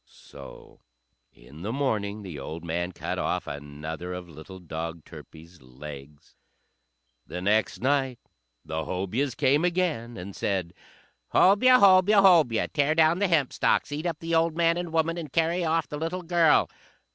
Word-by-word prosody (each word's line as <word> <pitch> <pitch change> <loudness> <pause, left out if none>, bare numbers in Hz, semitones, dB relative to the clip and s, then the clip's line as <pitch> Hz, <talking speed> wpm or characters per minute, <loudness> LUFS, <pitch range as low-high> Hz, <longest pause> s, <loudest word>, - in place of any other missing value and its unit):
So - - -14 0.5
in 65 +6 -15
the 105 +5 -3
morning 110 -6 -2
the 85 -7 -8
old 80 +5 -7
man 85 +2 -2
cut - - -5
off - - -2
another 75 +5 -7
of 90 -1 -7
little 85 +4 -12
dog 80 -1 -7
Turpie's 85 +1 -14
legs. 70 +3 -12 0.9
The 90 - -6
next 105 +4 0
night 135 -1 0 0.5
the 80 0 -4
Hobyahs 110 - -2
came 145 +5 +2
again, 170 -10 -1
and 95 +2 -8
said, 95 -4 -2 0.6
"Hobyah! 255 +7 +6
Hobyah! 195 +1 +6
Hobyah! 160 - +4
Tear 150 +1 +1
down 165 +2 +3
the 200 - +2
hempstalks, 150 -4 +1
eat 150 +4 -3
up 165 -3 -3
the 165 0 -4
old 165 0 +2
man 170 0 +3
and 175 -1 -4
woman, 165 +1 0
and 155 -5 -8
carry 165 +3 +1
off 165 0 0
the 150 - -6
little 170 +3 -3
girl!" 165 -3 +3
125 Hz, 155 wpm, -26 LUFS, -, 0.9 s, Hobyah